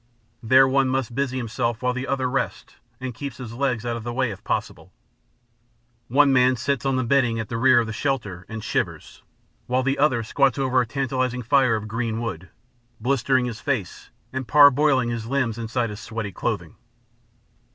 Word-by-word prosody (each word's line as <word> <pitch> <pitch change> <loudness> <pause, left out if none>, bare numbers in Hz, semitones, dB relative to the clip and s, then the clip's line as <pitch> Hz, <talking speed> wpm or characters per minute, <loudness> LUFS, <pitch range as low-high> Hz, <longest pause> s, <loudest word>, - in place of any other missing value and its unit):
There 130 +3 +5
one 135 0 +2
must 130 -2 -1
busy 130 0 -1
himself 120 -1 -2
while 125 0 +1
the 130 +2 -4
other 135 -2 0
rests 135 +1 -3 0.2
and 130 -1 -5
keeps 140 +1 -7
his 125 -3 -8
legs 125 -2 -1
out 120 -1 -1
of 115 - -6
the 120 - -4
way 125 -1 0
if 95 - -10
possible. - - -3 1.2
One 140 +2 +4
man 130 0 +4
sits 140 +1 -1
on 135 - +1
the 130 - 0
bedding 120 -2 +2
at 110 - -5
the 115 - -3
rear 130 +1 +5
of 120 - 0
the 115 - -5
shelter, 105 -9 -2
and 110 -1 -6
shivers, - - -3 0.5
while 130 +1 +1
the 135 +1 0
other 130 -6 +2
squats 135 +2 +1
over 130 -2 +2
a 120 - -3
tantalizing 130 -1 -2
fire 130 -1 +3
of 110 0 -4
green 115 0 -2
wood, 90 -7 -5 0.5
blistering 130 +1 +1
his 115 -2 -5
face 120 -11 -3 0.2
and 130 -2 -4
parboiling 145 -3 +5
his 115 -1 -4
limbs 125 -4 -1
inside 115 0 -2
his 105 - -8
sweaty 110 -1 -5
clothing. - - -4
125 Hz, 185 wpm, -23 LUFS, 115-135 Hz, 1.2 s, There